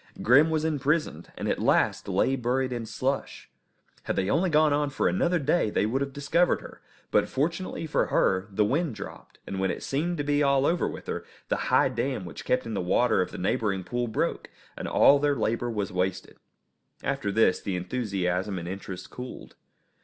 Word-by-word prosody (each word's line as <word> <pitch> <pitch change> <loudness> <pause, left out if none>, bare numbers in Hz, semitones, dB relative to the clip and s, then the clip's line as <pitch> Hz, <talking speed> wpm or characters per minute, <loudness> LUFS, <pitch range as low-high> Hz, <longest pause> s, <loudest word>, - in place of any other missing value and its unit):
Grim 145 +7 +6
was 160 -1 0
imprisoned, 150 - -1
and - - -3
at - - 0
last - - +2
lay 100 +8 +2
buried 130 +1 0
in 115 -2 -4
slush. 135 +5 -3 0.5
Had - - -1
they 95 +2 0
only 175 +5 +2
gone 155 -1 +4
on 145 0 +1
for 140 - 0
another 180 -1 +2
day 150 -4 +1
they 105 - +1
would 130 +6 0
have 140 0 -2
discovered 145 +6 +1
her; - - -12 0.3
but, - - +3
fortunately 165 +4 -2
for 155 - +1
her, 95 +1 +2
the 105 +1 +1
wind 145 +3 0
dropped, - - -10
and 95 - -5
when 95 0 +1
it - - -4
seemed 170 +6 -1
to 145 - -1
be 145 0 +1
all 140 -1 +3
over 170 +3 +1
with - - -7
her, - - -4 0.3
the - - +2
high - - +5
dam - - -2
which - - -9
kept 125 0 +1
in 115 - -4
the 100 - -1
water 95 +5 +2
of 90 - -1
the - - -8
neighbouring 95 +1 0
pool 120 +4 -2
broke, 110 - -2 0.3
and - - -5
all 140 - +5
their 145 0 +2
labour 120 -1 -1
was 105 -4 -2
wasted. 90 0 -2 0.7
After 135 -7 -1
this 110 -2 +3
the 95 - -3
enthusiasm 95 -2 -2
and 85 -1 -5
interest 95 0 -7
cooled. 125 0 -8
125 Hz, 200 wpm, -27 LUFS, 100-145 Hz, 0.7 s, Grim